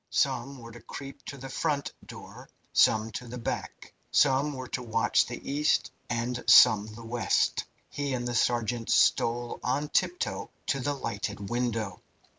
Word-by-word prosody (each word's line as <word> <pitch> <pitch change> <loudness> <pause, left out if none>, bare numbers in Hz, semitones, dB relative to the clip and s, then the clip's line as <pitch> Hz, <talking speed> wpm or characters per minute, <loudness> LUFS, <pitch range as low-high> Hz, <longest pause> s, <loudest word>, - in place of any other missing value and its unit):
Some 135 0 0
were 115 -2 -11
to 120 0 -12
creep 135 +4 -9
to 140 - -7
the 135 0 -8
front 140 +1 -2
door, - - -11 0.2
some 110 0 +4
to 125 - -6
the 125 +2 -7
back. 115 - -5 0.2
Some 140 +1 +3
were 130 -1 -6
to 125 - -3
watch 115 -1 +2
the 120 - -8
east, 150 +2 +1 0.2
and 120 +1 -2
some 105 -1 +8
the 110 +2 -10
west. 115 -3 +1 0.2
He 140 -2 -3
and 120 -1 -3
the 120 - -2
sergeant 120 0 0
stole 120 +1 +2
on 140 +4 -1
tiptoe 360 - -1 0.2
to 135 - 0
the 145 +2 -1
lighted 105 -4 -4
window. 115 -6 -2
120 Hz, 160 wpm, -28 LUFS, 115-135 Hz, 0.2 s, some